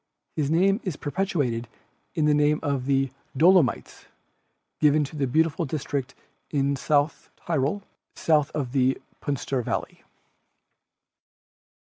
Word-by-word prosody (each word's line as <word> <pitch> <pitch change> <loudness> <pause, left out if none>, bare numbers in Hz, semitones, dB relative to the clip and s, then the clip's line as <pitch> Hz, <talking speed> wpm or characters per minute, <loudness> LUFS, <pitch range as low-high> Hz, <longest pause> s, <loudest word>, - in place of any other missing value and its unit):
His 150 -3 0
name 195 +6 +3
is 185 -7 -3
perpetuated 145 - -1 0.5
in 155 -3 +2
the 150 - +4
name 150 +1 +3
of 140 -3 -1
the 135 -1 +2 0.3
"Dolomites," 170 -4 +3 0.7
given 150 0 +4
to 145 - -7
the 140 -3 0
beautiful 160 +5 +1
district 140 -3 -3 0.3
in 140 -1 +1
South 145 +2 0
Tyrol, 160 +4 -1 0.3
south 155 -2 +2
of 135 -5 -2
the 130 -1 +2 0.2
Puster 140 -2 -2
Valley. - - -4
145 Hz, 115 wpm, -25 LUFS, 135-160 Hz, 0.7 s, the